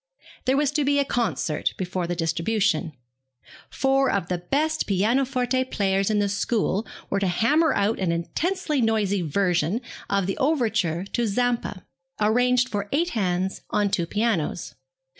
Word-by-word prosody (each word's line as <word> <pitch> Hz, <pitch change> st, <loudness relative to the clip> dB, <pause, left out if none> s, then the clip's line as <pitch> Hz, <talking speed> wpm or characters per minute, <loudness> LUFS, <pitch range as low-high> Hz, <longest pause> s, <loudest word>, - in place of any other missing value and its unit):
There 265 Hz, +1 st, +2 dB
was 290 Hz, -1 st, +2 dB
to 295 Hz, 0 st, +1 dB
be 285 Hz, +1 st, +2 dB
a 280 Hz, -, +2 dB
concert 225 Hz, -, -1 dB
before 180 Hz, -1 st, -2 dB
the 175 Hz, -, -2 dB
distribution. 165 Hz, +1 st, 0 dB, 0.8 s
Four 270 Hz, 0 st, +2 dB
of 195 Hz, -3 st, -1 dB
the 180 Hz, -1 st, -1 dB
best 310 Hz, -, 0 dB
pianoforte 250 Hz, +5 st, +1 dB
players 195 Hz, -4 st, 0 dB
in 215 Hz, -, +1 dB
the 205 Hz, -1 st, +2 dB
school 205 Hz, +1 st, 0 dB, 0.2 s
were 200 Hz, -, +1 dB
to 195 Hz, -, 0 dB
hammer 300 Hz, -, +3 dB
out 205 Hz, +3 st, +1 dB
an 185 Hz, -3 st, 0 dB
intensely 300 Hz, -, -1 dB
noisy 210 Hz, -4 st, +1 dB
version 175 Hz, +3 st, +1 dB, 0.3 s
of 200 Hz, -1 st, +1 dB
the 195 Hz, -, -2 dB
overture 220 Hz, -, +1 dB
to 240 Hz, -1 st, +1 dB
Zampa, 235 Hz, -3 st, -1 dB, 0.3 s
arranged 245 Hz, +4 st, +3 dB
for 205 Hz, -2 st, -3 dB
eight 335 Hz, +5 st, +1 dB
hands 190 Hz, -, -1 dB
on 205 Hz, -1 st, +1 dB
two 170 Hz, -3 st, 0 dB
pianos. 210 Hz, -5 st, -1 dB
210 Hz, 150 wpm, -24 LUFS, 185-255 Hz, 0.8 s, hammer